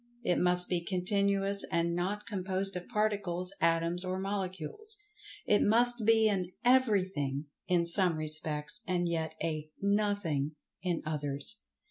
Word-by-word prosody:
It 180 - +1
must 180 0 +3
be 175 -2 -1
continuous 200 +2 +1
and 170 0 +1
not 195 +4 -2
composed 195 -1 -2
of 180 0 -6
Particles, 200 -4 -1
Atoms 165 +2 +2
or 185 0 -2
Molecules. 195 - -3 0.5
It 205 - +3
must 240 +1 +3
be 225 -1 +5
an 185 -4 -1
"everything" 190 - +2 0.2
in[Pg 180 -1 +3
105] - - -5
some 175 -1 +3
respects, 155 +4 -1
and 175 -1 0
yet 160 -2 -2
a 155 -2 -3
"nothing" 200 -8 0 0.3
in 175 -2 -2
others. 145 +6 +1
180 Hz, 135 wpm, -31 LUFS, 165-205 Hz, 0.5 s, be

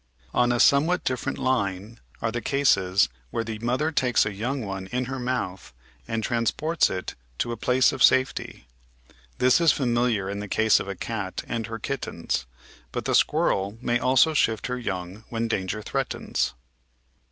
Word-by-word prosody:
On 120 0 +3
a 120 - +1
somewhat 155 +8 +4
different 130 -2 -2
line 110 -3 -1 0.2
are 115 - +1
the 120 +2 -3
cases 100 -8 +3 0.2
where 115 - -2
the 110 -1 -5
mother 125 +7 0
takes 125 -6 +2
a 105 - -3
young 120 +5 -3
one 95 -1 -5
in 125 +5 -2
her 130 +1 -4
mouth 120 - -3 0.3
and 115 -1 -2
transports 125 +9 +1
it 90 -1 -4 0.2
to 120 - -1
a - - -2
place 125 +4 +3
of 135 -3 -6
safety. 130 - +2 0.7
This 130 +6 +4
is 165 - +6
familiar 120 -6 +1
in 100 +1 -4
the 105 - -5
case 110 +2 +3
of - - -5
a 100 - -4
cat 105 -1 -4
and 115 -2 -3
her 115 0 -5
kittens, 135 - -3 0.4
but - - -4
the - - 0
squirrel 100 +3 +2
may 120 0 0
also 130 +5 +4
shift 110 -7 +1
her 125 0 -2
young 95 -2 -5
when 115 0 -1
danger 105 -1 -2
threatens. - - -2
115 Hz, 170 wpm, -25 LUFS, 100-130 Hz, 0.7 s, is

